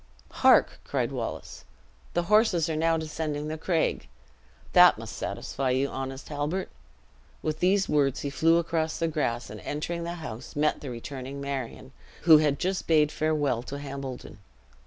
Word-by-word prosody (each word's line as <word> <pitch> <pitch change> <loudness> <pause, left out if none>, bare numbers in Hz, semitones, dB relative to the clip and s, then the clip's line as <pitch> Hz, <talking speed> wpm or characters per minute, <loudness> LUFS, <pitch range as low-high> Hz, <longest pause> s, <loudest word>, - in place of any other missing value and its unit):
"Hark!" - - +5
cried - - -1
Wallace, - - -5 0.5
"the 175 - +2
horses 200 -4 +3
are 160 - -2
now 165 +1 +2
descending 155 -1 -3
the 155 - -3
craig. 165 -1 0 0.7
That - - +8
must - - -8
satisfy 135 -1 -3
you, 130 +2 +1
honest 135 +1 -6
Halbert." 150 +6 -2 0.7
With 155 0 -2
these 190 +2 +3
words 140 -3 +1
he 140 - -3
flew 165 +4 +4
across 160 -1 -1
the 165 - 0
grass, 125 -7 -2
and - - -8
entering 170 +3 -4
the 170 +1 -4
house, 125 -7 -8
met 150 +1 +1
the 140 - -6
returning 130 +3 -6
Marion, 135 -1 -5 0.3
who 160 -2 +8
had 150 -2 +2
just 185 +4 -2
bade 155 -2 +4
farewell 145 -6 0
to 135 +3 -7
Hambledon. 135 -6 -7
150 Hz, 155 wpm, -27 LUFS, 135-165 Hz, 0.7 s, That